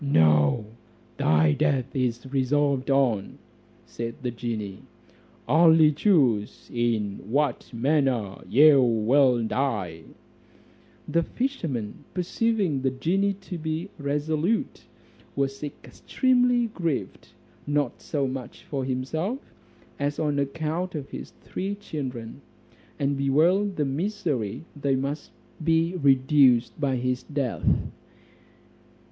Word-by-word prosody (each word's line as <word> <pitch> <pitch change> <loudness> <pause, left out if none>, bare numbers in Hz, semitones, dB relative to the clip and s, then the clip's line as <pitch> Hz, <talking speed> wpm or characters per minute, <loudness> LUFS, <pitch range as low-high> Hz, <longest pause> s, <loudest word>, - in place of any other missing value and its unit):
"No, 75 - +3 0.5
thy 80 0 +3
death 130 - 0
is 120 -2 -1
resolved 135 +1 +1
on," 130 -8 +1 0.5
said 115 0 -5
the 125 - -1
genie, 110 -5 -5 0.7
"only 160 -1 +6
choose 140 - +1
in 115 -4 0
what 140 0 0
manner 125 -5 0
you 145 +1 +7
will 120 +2 +3
die." 105 -11 -2 1.0
The 170 - +2
fisherman 165 - -3
perceiving 185 -4 0
the 135 - +2
genie 190 +10 0
to 180 -3 -6
be 160 +5 -3
resolute, 150 +8 -1 0.5
was 135 0 -1
extremely 245 - +1
grieved, 170 - -3 0.4
not 145 0 -1
so 145 -3 -1
much 130 -1 -6
for 135 -2 -4
himself, 135 - -2 0.6
as 145 +1 -1
on 150 -2 0
account 160 +5 -2
of 140 -3 -6
his - - -7
three 195 +2 -4
children; 135 - -6 0.6
and 140 0 0
bewailed 165 +9 +2
the 150 - 0
misery 145 - -2
they 140 -2 0
must 140 +3 -3 0.3
be 165 +2 +2
reduced 135 -4 +4
to - - -22
by 135 -2 +1
his 125 0 -1
death. 140 -5 -3
140 Hz, 105 wpm, -26 LUFS, 125-160 Hz, 1.0 s, you